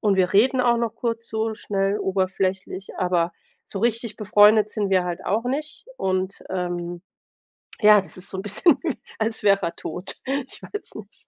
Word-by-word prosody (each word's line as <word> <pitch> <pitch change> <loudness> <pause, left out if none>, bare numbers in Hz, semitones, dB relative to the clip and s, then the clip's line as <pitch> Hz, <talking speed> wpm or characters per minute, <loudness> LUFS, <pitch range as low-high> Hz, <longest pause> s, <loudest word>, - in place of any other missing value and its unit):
und 200 -2 +2
wir 185 -1 +2
reden 255 +5 +4
auch 235 -1 +3
noch 235 -2 -1
kurz 230 -1 -3
so 220 0 -1
schnell 200 -1 -1
oberflächlich, 190 0 -2
aber 175 -2 +1 0.3
so 195 - -5
richtig 230 -1 0
befreundet 210 0 +5
sind 205 -3 -1
wir 185 -2 +3
halt 175 -1 -4
auch 220 +5 +1
nicht, 295 +5 -4
und, 185 +1 -1
ähm, 175 -1 -3 0.8
ja, 210 0 +8
das 190 - -7
ist 185 +2 -8
so 190 - -6
'n - - -2
bisschen, 210 - +3 0.4
als 220 0 -1
wär 200 -1 +4
er 170 - -2
tot. 175 +4 -5 0.3
Ich - - -14
weiß 415 - -7
nicht. - - -12
200 Hz, 175 wpm, -23 LUFS, 185-225 Hz, 0.8 s, ja